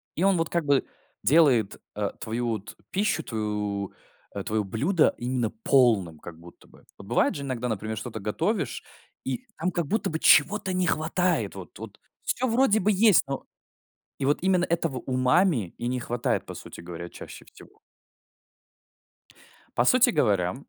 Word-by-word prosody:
и 170 - -1
он 195 -2 +4
вот 165 -1 -1
как 170 -3 -1
бы 140 -1 +3 0.4
делает, 130 -5 +3
э, 105 -1 -1
твою 120 +2 -2
вот 105 -2 -5 0.2
пищу, 195 -4 0
твою, 105 -4 -3 0.4
э, - - -3
твоё 110 0 -1
блюдо 145 - +2
именно 120 -2 -1
полным, 110 - +3
как 85 0 -10
будто 85 +1 -16
бы. - - -19 0.2
Вот - - -12
бывает - - +2
же 140 - -5
иногда, 125 -2 -3
например, 110 0 -3
что-то 110 +1 -6
готовишь, 160 - -2 0.4
и 250 - -3
там 180 +3 -1
как 170 -5 -2
будто 220 +6 0
бы 160 - -3
чего-то 190 +6 +4
не 185 0 +1
хватает. 175 +4 0
Вот, - - -10
вот - - -10 0.2
всё 255 - -1
вроде 230 -2 +3
бы 210 +2 +2
есть, 210 -1 +5
но 135 -1 -4 0.7
И 135 - -3
вот 145 +2 +2
именно 185 -1 +3
этого 165 -5 -1
умами 130 - +1
и 120 - -3
не 125 0 -1
хватает, 120 0 -1
по - - -7
сути - - -10
говоря, 85 0 -8
чаще - - -11
всего. - - -17 2.0
По 120 - +3
сути 255 - +5
говоря, 100 - +1
130 Hz, 165 wpm, -26 LUFS, 110-175 Hz, 2.0 s, есть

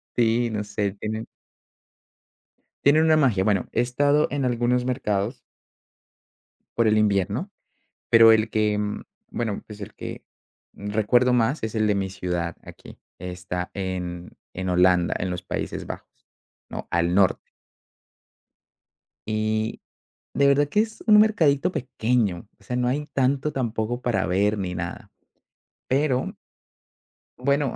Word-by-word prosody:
Sí, 120 0 +2
no 105 -1 -2
sé, 105 -1 -2
tiene 110 +1 -4 1.6
Tiene 145 +2 +5
una 160 -1 +4
magia, 115 -10 +3
bueno, 100 -3 +1
he - - -1
estado 145 +4 +2
en 140 -1 -2
algunos 120 0 +1
mercados. 115 -2 -1 1.4
Por 115 -1 +3
el 110 0 +3
invierno, 100 -3 +1 0.6
pero 115 -1 +8
el 110 0 +3
que, 105 -1 +1
mm, 105 0 -3 0.3
bueno, 110 -4 -3
pues, 105 -1 -10
el - - -8
que - - -7 0.5
recuerdo 110 +5 +1
más 120 +3 +1
es 110 0 -3
el 110 -1 +2
de 105 - +2
mi 95 -1 -1
ciudad. 90 -3 -3
Aquí - - -13 0.2
está 90 0 -5
en 90 -2 -4 0.2
en 95 0 -4
Holanda, 90 -1 +3
en 90 - -3
los 90 0 -4
Países - - -4
Bajos, - - -10 0.4
¿no?, - - -6
al 85 +1 +1
norte. 100 -2 +2 1.8
Y, 110 0 -1 0.5
de 140 0 +3
verdad 140 +1 +4
que 210 - +3
es 220 0 -5
un 210 -1 +8
mercadito 180 -6 +3
pequeño. 110 - -1
O - - -23
sea, 125 - -4
no 125 0 +1
hay 145 +4 -1
tanto 135 +3 +1
tampoco 120 -1 -2
para 110 -6 0
ver 100 +3 +1
ni 90 -2 -3
nada, 85 0 -6 0.8
pero 130 -1 0 1.0
Bueno, 140 +1 0
110 Hz, 135 wpm, -24 LUFS, 95-125 Hz, 1.8 s, pero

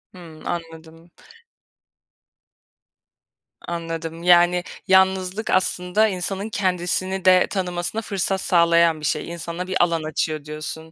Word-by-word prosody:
Hımm, 165 -3 -13
anladım. 165 0 -7 2.6
Anladım. 165 -1 -5
Yani, 175 0 +5 0.2
yalnızlık 190 +2 +2
aslında 185 +3 +2
insanın 195 +1 -3
kendisini 185 -1 -1
de 185 -1 +5
tanımasına 180 +2 -3
fırsat 195 -2 -2
sağlayan 170 -2 +3
bir 150 - -6
şey. 150 - -1
İnsana 170 +2 -6
bir 185 -1 +2
alan 165 -2 0
açıyor, 155 -1 -3
diyorsun. 155 +1 -7
175 Hz, 105 wpm, -22 LUFS, 165-185 Hz, 2.6 s, Yani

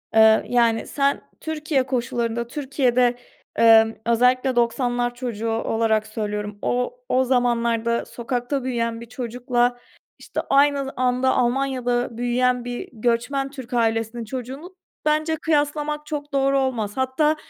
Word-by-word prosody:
Iıı, 220 0 +6
yani, 235 -2 +2
sen 280 0 0 0.2
Türkiye 305 -3 -1
koşullarında 235 -2 -2
Türkiye'de, 255 -3 +1 0.4
ımm, 225 -1 +6
özellikle 250 +2 +3
90'lar 240 0 0
çocuğu 230 -3 -3
olarak 225 -1 0
söylüyorum, 210 -1 -4
o 250 - -1
o 260 +1 +3
zamanlarda 235 -2 +1
sokakta 245 +3 -3
büyüyen 230 -2 -2
bir - - -8
çocukla, 245 0 -1 0.4
işte, - - -4
aynı 280 0 +4
z - - -6
anda 255 +1 +2
Almanya'da 245 -2 0
büyüyen 245 0 +1
bir 245 0 -5
göçmen 245 +4 0
Türk 260 -3 -9
ailesinin 225 0 0
çocuğunu 265 - -7 0.3
bence 310 +1 +1
kıyaslamak 300 -1 -1
çok 290 -1 -5
doğru 275 0 +2
olmaz. 235 -5 -2
Hatta 265 +4 +2
245 Hz, 125 wpm, -23 LUFS, 235-270 Hz, 0.4 s, Iıı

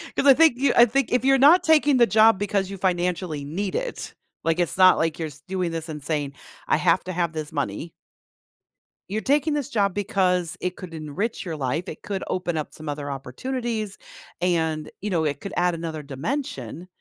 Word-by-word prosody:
'Cause - - 0
I 275 - +9
think 315 -3 +4
you 270 -1 +2
I 235 - +8
think 265 +2 0
if 250 +1 +1
you're 270 0 +5
not 325 +7 +6
taking 300 -4 +4
the 235 -1 +5
job 220 -1 +5
because 200 -2 -1
you 195 - -6
financially 175 -4 -1
need 185 +7 -3
it, - - -4 0.3
like, 165 +2 +1
it's 175 +2 0
not 185 -1 +7
like 160 0 -1
you're 160 -2 -3 0.2
doing 185 -2 -2
this 165 0 -5
and 150 -2 -6
saying, 145 -2 -2 0.3
"I - - +3
have - - +2
to 185 - -4
have 170 -1 -1
this 155 -1 -5
money" 145 +2 -3 1.2
you're 215 +3 -3
taking 290 +5 +1
this 290 -2 -2
job 200 -7 +1
because 185 -4 0
it 180 0 -2
could 180 -3 -9
enrich 165 +10 -4
your 165 - -4
life, 150 +4 -2
it - - -8
could 195 -2 -4
open 175 -3 -2
up 150 - -4
some 155 -1 -8
other 145 -1 -4
opportunities, 215 - -4 0.4
and, 160 -3 0
you 210 - -3
know, 165 -4 +1
it 145 -2 -1
could 200 - -7
add 175 0 +2
another 160 -2 -5
dimension, 150 - -5
180 Hz, 200 wpm, -24 LUFS, 160-225 Hz, 1.2 s, I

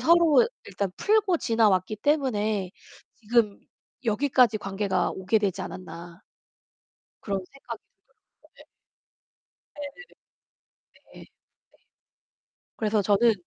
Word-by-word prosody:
서로 340 +5 +5 0.2
일단 200 -1 -3
풀고 420 -4 +2
지나왔기 215 -6 +2
때문에 215 - 0 0.4
지금 225 -2 +1 0.4
여기까지 240 -1 +3
관계가 195 -2 -1
오게 190 +4 +1
되지 195 -2 -1
않았나 175 -1 -9 1.0
그런 195 -2 -2
생각이 275 +6 -10 0.3
들더라고요. - - -31
네. - - -17 1.1
네. 290 - -8 1.3
예. - - -12
네. - - -13 1.5
그래서 215 -1 +1
저는 210 +4 +4
215 Hz, 215 characters per minute, -26 LUFS, 195-255 Hz, 1.5 s, 서로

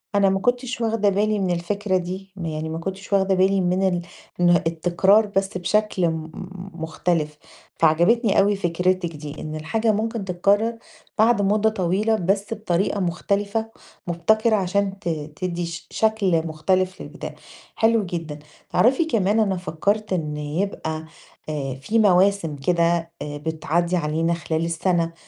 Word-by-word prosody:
أنا 200 -1 +4
ما 195 0 +1
كنتش 245 +2 -1
واخدة 225 -2 +2
بالي 210 +2 +1
من 185 -2 0
الفكرة 190 +3 -1
دي، 185 +2 -5
م 185 -3 -6
يعني 155 0 -3
ما 160 - -4
كنتش 195 +3 -5
واخدة 195 -1 +3
بالي 190 +1 +3
من 185 +2 +2
ال 180 -2 0 0.4
من 175 0 +4 0.2
التكرار 175 +6 +3
بس 195 -2 -1
بشكل 190 0 +1
م 160 0 -5 0.4
مختلف 160 -2 -2 0.4
فعجبتني 180 +8 +3
أوي 200 +1 +3
فكرتِك 180 -2 0
دي، 150 0 -8
إن 155 0 -5
الحاجة 220 +9 0
ممكن 220 0 -2
تتكرر 200 +5 +1 0.4
بعد 225 0 +4
مدة 210 +2 +3
طويلة 205 +2 +1
بس 200 +2 0
بطريقة 200 -2 -1
مختلفة 200 +5 -1 0.4
مبتكرة 215 +6 +2
عشان 195 0 0
ت 195 - -3
تدّي 170 +3 -3
ش 165 0 -7
شكل 195 -7 +1
مختلف 185 +4 0
للبداية، - - -8 0.4
حلو 225 -2 +3
جدًا. 165 -4 -5 0.3
تعرفي 265 +7 +3
كمان 215 -7 +1
أنا 195 -4 +1
فكرت 200 +4 -1
إن 155 -4 -2
يبقى 160 0 -3 0.4
آآ 140 -3 -3
فيه 220 +11 +1
مواسم 195 -5 +3
كده 170 +3 +1
آآ 145 0 -5
بتعدي 160 +3 -1
علينا 165 +1 0
خلال 165 -1 -2
السنة 170 0 0
185 Hz, 145 wpm, -23 LUFS, 165-205 Hz, 0.4 s, أنا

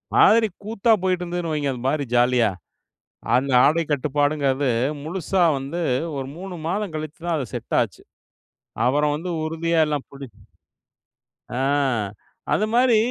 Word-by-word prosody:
மாதிரி 225 0 +6 0.2
கூத்தா 225 +2 +1
போயிட்டு 185 -1 +1
இருந்ததுன்னு 175 -1 -3
வைங்க. 145 -2 0
அந்த 125 - -8
மாதிரி 145 +1 0
ஜாலியா 120 -1 +4 0.9
அந்த 135 +2 +1
ஆடை 165 +3 +3
கட்டுப்பாடுங்கிறது 145 -1 +1 0.3
முழுசா 180 +3 -1 0.2
வந்து 140 +6 -4 0.4
ஒரு 135 -1 -4
3 185 0 -7
மாதம் 195 0 -2
கழிச்சு 155 0 -6
தான் 170 -2 0
அது 135 - -2
செட் - - -3
ஆச்சு. - - -4 0.8
அப்புறம் 145 +3 +2
வந்து 170 +4 -5 0.2
உறுதியா 165 +1 0
எல்லாம் 150 -2 -3
பிடிச்சி 135 -4 -11 1.2
ஆ, - - -2 1.0
அந்த 215 - +2
மாதிரி 245 -2 +5
155 Hz, 135 wpm, -23 LUFS, 140-180 Hz, 1.2 s, மாதிரி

